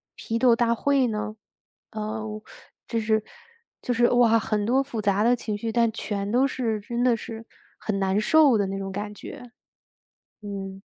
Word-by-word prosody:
批 230 +1 -3
斗 245 -3 +5
大 235 0 +2
会 275 +1 +2
呢？ 215 -1 -3 0.6
呃， 215 0 -4 0.6
只 230 - -1
是 220 0 +1 0.6
就 245 - 0
是， 240 +1 +3
哇， 235 -2 +4
很 210 -1 -1
多 260 +4 +3
复 240 -5 -6
杂 200 +1 +2
的 245 +2 +4
情 215 -3 -4
绪， 225 +1 -3
但 230 -1 +2
全 205 -2 -3
都 260 +3 +3
是， 230 -5 -2
真 235 +4 -3
的 240 -2 +3
是 225 -1 -8 0.3
很 210 -2 -2
难 195 +1 +1
受 295 0 +5
的 200 -2 0
那 195 0 -4
种 195 0 -4
感 205 +2 -5
觉。 245 +2 -10 0.9
嗯。 195 -1 -6
225 Hz, 185 characters per minute, -25 LUFS, 210-240 Hz, 0.9 s, 斗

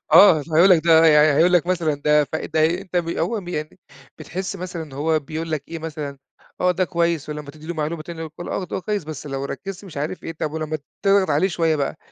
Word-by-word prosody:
آه. 170 -7 +8
فهيقول 165 +5 +4
لك 170 -3 +6
ده 165 -1 +6
يعني 150 -1 +5
هيقول 180 +2 +5
لك 175 -1 +3
مثلًا 170 -5 +1
ده 150 +1 +3
ف- - - -23 0.3
ده 155 - +3
ي 165 +4 +2
أنت 185 -2 -6
م 170 -1 -1
هو 230 -2 -1
م 175 - -11
يعني 155 +1 -5 0.4
بتحِس 190 +2 -5
مثلًا 180 -2 -5
إن 150 -4 -11
هو 155 +3 +1
بيقول 160 +3 -5
لك 150 -3 -2
إيه 165 0 -5
مثلًا 150 -3 -6 0.4
آه، 180 0 +3
ده 185 +1 +1
كويس 170 -3 -1
ولمّا 150 -1 -6
تدّي 155 +1 -14
له 175 - -4
معلومة 155 +1 -3
تاني 170 0 -9
يقول 160 -1 -5 0.2
لك - - -4
آه، 190 - -2
ده 180 - -5
هو - - -3
كويس 205 -2 -2
بس 155 -1 -7
لو 135 -1 -4
ركّزت 195 +8 -6
مش 170 -6 -11
عارف 150 +5 -4
إيه، 165 - -4
طب 155 -1 -4
ولمّا 155 -1 -3 0.3
تضغط 195 -3 +4
عليه 155 +7 +3
شوية 165 -2 +1
بقى 140 +1 -2
160 Hz, 255 wpm, -22 LUFS, 150-175 Hz, 0.4 s, آه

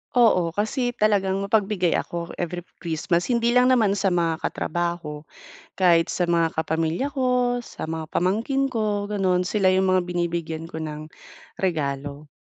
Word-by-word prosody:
Oo, 195 -8 +4
kasi 220 - -1
talagang 205 -4 +1
mapagbigay 200 -3 +1
ako 170 0 -4
every 175 0 -3 0.2
Christmas. 170 +5 0
Hindi 235 +1 +2
lang 250 +1 +5
naman 215 -6 +3
sa 195 -2 +1
mga 170 -2 0
katrabaho, 170 -3 -3 0.5
kahit 170 -3 +4
sa 175 -1 -1
mga 165 -1 +2
kapamilya 160 - -1
ko, 250 -2 +1
sa 160 -8 -7
mga 160 -1 -4
pamangkin 230 - 0
ko, 210 -3 -1
gano'n. 185 -3 +1
Sila 190 +2 0
yung 190 0 +2
mga 185 -1 +2
binibigyan 170 -2 -3
ko 160 - -6
ng 155 0 -6 0.5
regalo. 145 -4 -2
180 Hz, 145 wpm, -24 LUFS, 165-215 Hz, 0.5 s, lang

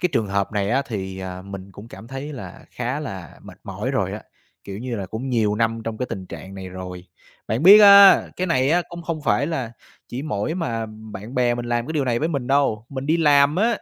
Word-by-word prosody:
cái 180 - +2
trường 110 - +1
hợp 100 +1 -1
này 100 -1 -1
á 135 +3 +2
thì, 95 -5 -5
à, 95 -1 -6
mình 100 0 -9
cũng 105 +4 -12
cảm 110 +1 -12
thấy 135 +3 -6
là 130 - -9
khá 125 +4 -3
là 95 - -8
mệt - - -13
mỏi - - -4
rồi - - -1
á, - - -6 0.4
kiểu 100 0 -7
như 120 -1 -4
là, 95 -2 -4
cũng 115 +7 -5
nhiều 110 -4 +1
năm 115 +1 0
trong 115 -1 -4
cái 125 - -2
tình 95 -1 -5
trạng 95 +1 -9
này 95 -1 -7
rồi. 90 -1 -8 0.4
Bạn 115 +6 -1
biết 200 +4 +10
á 200 -1 +9
cái 185 - -1
này 130 -4 +2
á 175 +2 +3
không 170 0 -8
không 165 -3 -4
phải 125 +1 +1
là 130 -9 -3 0.4
chỉ 125 +3 -5
mỗi 145 +1 -2
mà 115 -10 -3 0.3
bạn 105 +6 -8
bè 125 -1 +2
mình 120 0 -5
làm 120 0 -1
cái - - -4
điều 150 -3 0
này 120 -2 0
với 160 - -1
mình 140 -7 -3
đâu, 135 -5 +1
mình 135 0 -6
đi 160 - +3
làm 145 -1 +4
á, 220 +5 +3
120 Hz, 250 wpm, -22 LUFS, 100-145 Hz, 0.4 s, biết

